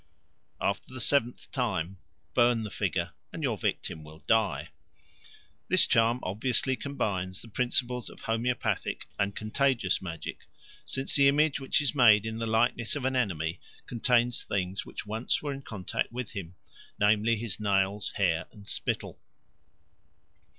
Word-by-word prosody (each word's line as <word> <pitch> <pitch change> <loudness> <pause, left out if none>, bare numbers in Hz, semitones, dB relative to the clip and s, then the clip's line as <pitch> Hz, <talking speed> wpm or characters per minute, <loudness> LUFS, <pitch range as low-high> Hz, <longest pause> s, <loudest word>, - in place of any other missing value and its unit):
After - - -1
the 130 - -7
seventh 125 -1 +1
time 95 - -1 0.3
burn 120 -1 +4
the 105 - -5
figure, - - -1 0.2
and - - -6
your - - +1
victim 80 - -2
will 80 +1 -13
die. 110 -3 +2 1.0
This - - +5
charm 115 +2 +3
obviously 125 +6 0
combines 95 -9 -2
the - - -11
principles 125 +1 0
of - - -13
homoeopathic 115 +2 -1
and 100 0 0
contagious 115 -2 +1
magic; 85 -3 -6 0.4
since 135 +1 -1
the 140 -1 +6
image 145 +1 +3
which 135 - +2
is 145 - +1
made 110 -6 +6
in 110 0 -3
the 115 - -1
likeness 115 +1 +2
of 140 -3 -3
an 130 0 +1
enemy 85 -9 0 0.3
contains 120 0 +2
things 95 0 -2
which - - -7
once 110 +7 -1
were 145 -1 -2
in 135 - -7
contact 105 -7 -3
with 125 -1 -5
him, 90 -4 -6 0.4
namely, 105 +2 +4
his 110 -3 -4
nails, 100 0 +1
hair, 85 -5 +1
and 100 -1 -15
spittle. - - -2
115 Hz, 145 wpm, -29 LUFS, 100-125 Hz, 1.0 s, the